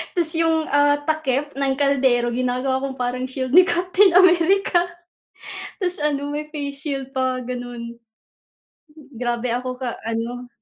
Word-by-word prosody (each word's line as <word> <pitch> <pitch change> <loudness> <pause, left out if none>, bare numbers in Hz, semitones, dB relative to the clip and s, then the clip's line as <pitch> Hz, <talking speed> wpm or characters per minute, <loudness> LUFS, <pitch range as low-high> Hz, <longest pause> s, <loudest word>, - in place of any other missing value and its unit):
ta's 335 -3 +2
'yong, 325 -1 +2
ah, 290 0 +4
takip 295 -2 -1
ng 270 -1 +1
kaldero 265 -4 +2
ginagawa 255 +2 -1
kong 270 0 -4
parang 250 +1 -2
shield 260 0 -3
ni 360 +4 +7
Captain 365 +2 +3
America. 360 0 +4 0.9
Tapos 365 -4 0
ano, 290 -1 -1
may 300 +1 -4
face 285 -2 -6
shield 275 -2 -4
pa, 260 -1 -1
gano'n. 245 -1 -6 1.2
Grabe 240 0 -2
ako 255 +1 -3
ka 250 -2 -5
ano, 230 +2 -4
270 Hz, 135 wpm, -21 LUFS, 250-315 Hz, 1.2 s, ni